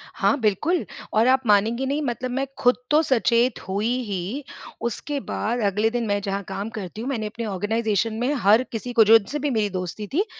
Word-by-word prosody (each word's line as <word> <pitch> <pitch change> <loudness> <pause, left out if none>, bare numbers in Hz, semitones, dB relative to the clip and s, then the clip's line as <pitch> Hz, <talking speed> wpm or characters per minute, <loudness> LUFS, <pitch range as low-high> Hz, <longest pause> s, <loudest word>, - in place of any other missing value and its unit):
हाँ, - - +2
बिल्कुल 245 - +1 0.3
और 220 +3 +4
आप 260 +1 +4
मानेंगे 220 +5 +3
नहीं, 285 +3 -1
मतलब 250 -2 -3
मैं 270 +2 -1
खुद 245 0 +4 0.2
तो 305 - +6
सचेत 240 -3 +2
हुई 200 +4 -1 0.2
ही, 205 +6 -4 0.4
उसके 280 +5 -3
बाद 240 -2 -2
अगले 210 +3 +2
दिन 235 0 -2
मैं 205 0 +1
जहाँ 200 0 -3
काम 205 +3 -4
करती 200 +1 -6
हूँ, 250 - -3
मैंने 230 -6 -2
अपने 230 +2 -6
ऑर्गेनाइज़ेशन 215 +2 0
में 250 +4 +1
हर 215 +5 +5
किसी 240 +2 -5
को 230 - +7
जो 225 +2 +8
जिससे 250 +8 -5
भी 290 0 -1
मेरी 215 -4 +1
दोस्ती 185 +2 -5
थी, 350 - 0
225 Hz, 200 wpm, -23 LUFS, 205-255 Hz, 0.4 s, जो